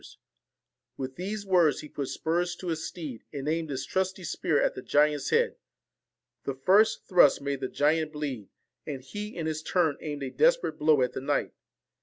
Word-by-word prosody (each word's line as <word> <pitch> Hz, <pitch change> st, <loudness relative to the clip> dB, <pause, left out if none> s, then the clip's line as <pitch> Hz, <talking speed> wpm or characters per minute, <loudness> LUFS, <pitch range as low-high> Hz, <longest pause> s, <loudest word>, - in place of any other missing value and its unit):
ORSON -, -, -15 dB, 0.8 s
With 130 Hz, -1 st, -5 dB
these 200 Hz, +3 st, -4 dB
words 175 Hz, -5 st, +3 dB
he -, -, -9 dB
put 140 Hz, -2 st, -4 dB
spurs 175 Hz, +4 st, -1 dB
to 180 Hz, 0 st, -6 dB
his 160 Hz, -1 st, -2 dB
steed, 150 Hz, -10 st, -7 dB
and 140 Hz, -1 st, -5 dB
aimed 160 Hz, 0 st, -1 dB
his 135 Hz, -1 st, -3 dB
trusty 190 Hz, +2 st, -1 dB
spear 155 Hz, -3 st, 0 dB
at -, -, +2 dB
the -, -, -7 dB
giant's 145 Hz, +1 st, +2 dB
head. -, -, +2 dB, 0.9 s
The 140 Hz, -, -3 dB
first 200 Hz, +11 st, +3 dB
thrust 175 Hz, -7 st, +6 dB
made 140 Hz, -1 st, -3 dB
the 130 Hz, -, -2 dB
giant 155 Hz, +1 st, +1 dB
bleed, 135 Hz, -9 st, -4 dB, 0.4 s
and 135 Hz, -4 st, -5 dB
he, 210 Hz, +9 st, -6 dB
in 165 Hz, -, -3 dB
his 155 Hz, 0 st, -2 dB
turn, 160 Hz, -3 st, +1 dB
aimed 145 Hz, -2 st, -4 dB
a 130 Hz, -, -4 dB
desperate -, -, +2 dB
blow 150 Hz, -3 st, +4 dB
at 125 Hz, 0 st, -1 dB
the -, -, -4 dB
knight. 145 Hz, +1 st, -1 dB
155 Hz, 190 wpm, -28 LUFS, 140-175 Hz, 0.9 s, thrust